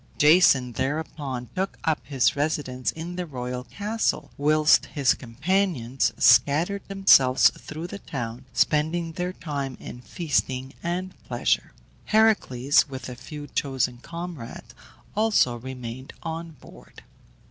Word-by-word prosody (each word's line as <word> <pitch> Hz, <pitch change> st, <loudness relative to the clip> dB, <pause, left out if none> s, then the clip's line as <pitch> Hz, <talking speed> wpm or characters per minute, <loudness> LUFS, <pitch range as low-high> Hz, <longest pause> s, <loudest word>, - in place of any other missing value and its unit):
Jason 150 Hz, -5 st, +5 dB
thereupon 135 Hz, -1 st, -3 dB
took 190 Hz, +1 st, -2 dB
up 160 Hz, -2 st, +1 dB
his 130 Hz, -4 st, +2 dB
residence 140 Hz, -4 st, -1 dB
in 170 Hz, +2 st, -7 dB
the 180 Hz, -, -2 dB
royal 125 Hz, -3 st, -5 dB
castle, 215 Hz, +7 st, -2 dB
whilst 150 Hz, +1 st, +4 dB
his 140 Hz, -4 st, +2 dB
companions 135 Hz, 0 st, 0 dB
scattered 170 Hz, +8 st, +4 dB
themselves 140 Hz, -10 st, +5 dB
through 155 Hz, +2 st, -8 dB
the 200 Hz, +3 st, -7 dB
town, 120 Hz, -5 st, -6 dB
spending 160 Hz, +6 st, +1 dB
their 180 Hz, +2 st, -3 dB
time 140 Hz, -7 st, -5 dB
in 125 Hz, -, -9 dB
feasting 135 Hz, -4 st, -2 dB
and 180 Hz, +2 st, -3 dB
pleasure. -, -, 0 dB, 0.3 s
Heracles, 150 Hz, -, +3 dB
with 130 Hz, -1 st, -7 dB
a 125 Hz, -, -7 dB
few 145 Hz, +4 st, -9 dB
chosen 130 Hz, -4 st, -1 dB
comrades, 165 Hz, -8 st, -8 dB, 0.4 s
alone 205 Hz, -, +2 dB
remained 130 Hz, 0 st, -7 dB
on 165 Hz, 0 st, -5 dB
board. 150 Hz, -, -16 dB
145 Hz, 120 wpm, -25 LUFS, 130-170 Hz, 0.4 s, Jason